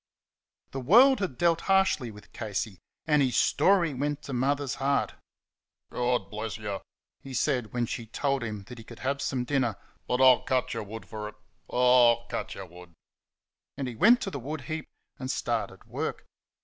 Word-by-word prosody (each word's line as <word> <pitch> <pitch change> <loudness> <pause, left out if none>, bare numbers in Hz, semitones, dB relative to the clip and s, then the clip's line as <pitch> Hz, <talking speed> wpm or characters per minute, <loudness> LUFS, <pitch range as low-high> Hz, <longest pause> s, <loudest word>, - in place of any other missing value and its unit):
The 135 - -4
world 240 - +6
had 180 -11 -3
dealt 170 -1 +2
harshly 190 -10 +3
with 105 -1 -14
Casey, 105 -3 -4 0.3
and 150 -2 +3
his 130 -3 +1
story 180 -6 +3
went 145 +2 -2
to 140 - -6
Mother's 140 +2 0
heart. 140 +1 +1 0.8
"God 120 -5 0
buless 110 0 -4
y'," 105 -3 -4 0.4
he 135 -1 -8
said 125 -5 0
when 120 -1 0
she 115 0 -5
told 140 +3 -1
him 105 -3 -5
he 120 -2 -10
could 115 +1 -12
have 140 +1 -2
some 130 -3 -1
dinner; 125 -5 0 0.3
"but 125 - 0
I'll 130 -2 +7
cut 130 -1 0
y' 115 - -3
wood 110 +1 -7
for 105 -1 -6
it; - - -15 0.3
oh, 125 -1 +6
I'll 120 - -17
cut - - -4
y' - - -7
wood!" 85 0 -14 0.8
And 135 -2 -2
he 125 - -4
went 235 - +6
to 195 - -3
the 140 - -4
wood 145 +4 -5
heap 155 +5 -5 0.3
and 130 -1 -5
started - - -2
work. - - -4
125 Hz, 180 wpm, -28 LUFS, 115-145 Hz, 0.8 s, I'll